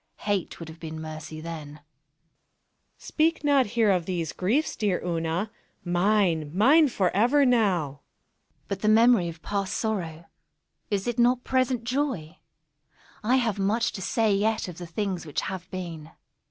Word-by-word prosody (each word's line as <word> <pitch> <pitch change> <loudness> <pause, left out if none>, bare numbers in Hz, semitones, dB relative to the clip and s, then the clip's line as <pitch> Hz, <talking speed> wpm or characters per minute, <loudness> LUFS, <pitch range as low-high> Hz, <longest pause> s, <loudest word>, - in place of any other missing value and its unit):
Hate 205 -4 -1
would 165 - -7
have 160 +1 -11
been 160 -1 -7
mercy 155 0 -7
then. 160 -2 -6
Monos. 150 - -15 1.2
Speak 325 +1 0
not 280 -4 +4
here 220 -3 +5
of 180 -3 0
these 175 -4 -2
griefs, 235 +12 0
dear 200 -4 0
Una—mine, 175 0 -1
mine, 295 +9 +6
forever 235 +6 +2
now! 215 -9 +3
_ - - -5
Una._ 140 - -21 0.7
But 200 -1 -4
the 215 - 0
memory 220 -4 +5
of 165 -1 -11
past 200 -2 -2
sorrow—is 195 0 -5
it 240 0 -2
not 245 +1 +3
present 255 -2 0
joy? 240 - -2 0.8
I 240 +4 +3
have 225 -6 0
much 220 +4 +1
to 190 - -7
say 215 +2 +1
yet 215 +2 0
of 180 -2 -8
the 175 - -7
things 185 -1 -3
which 150 - -2
have 185 -1 -6
been. 170 -5 -6
195 Hz, 155 wpm, -26 LUFS, 170-230 Hz, 1.2 s, mine